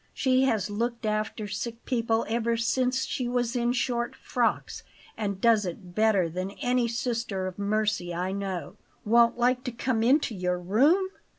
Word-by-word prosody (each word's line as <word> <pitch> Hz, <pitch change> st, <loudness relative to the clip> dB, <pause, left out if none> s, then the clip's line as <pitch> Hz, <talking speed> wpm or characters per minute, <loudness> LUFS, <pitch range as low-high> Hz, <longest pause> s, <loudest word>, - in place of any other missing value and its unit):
She 260 Hz, 0 st, +3 dB
has 220 Hz, -6 st, 0 dB
looked 235 Hz, +2 st, -2 dB
after 215 Hz, 0 st, -2 dB
sick 230 Hz, +4 st, -5 dB
people 230 Hz, -2 st, 0 dB
ever 230 Hz, +1 st, 0 dB
since 255 Hz, +3 st, +1 dB
she 250 Hz, -, -2 dB
was 245 Hz, 0 st, -1 dB
in 240 Hz, 0 st, +1 dB
short 240 Hz, -1 st, -1 dB
frocks, -, -, -1 dB, 0.3 s
and 200 Hz, -3 st, -3 dB
does 225 Hz, -1 st, +4 dB
it 180 Hz, 0 st, -7 dB
better 215 Hz, -3 st, +3 dB
than 185 Hz, +3 st, -4 dB
any 245 Hz, -3 st, +1 dB
sister 230 Hz, -4 st, -2 dB
of 185 Hz, +1 st, -6 dB
mercy 205 Hz, -3 st, 0 dB
I 180 Hz, +2 st, -2 dB
know. 195 Hz, -2 st, -4 dB, 0.3 s
Won't 235 Hz, +2 st, +4 dB
like 250 Hz, +1 st, +2 dB
to 250 Hz, -, -2 dB
come 235 Hz, -1 st, -1 dB
into 255 Hz, +1 st, +3 dB
your 180 Hz, -2 st, -1 dB
room! 280 Hz, -, +3 dB
230 Hz, 165 wpm, -27 LUFS, 200-245 Hz, 0.3 s, does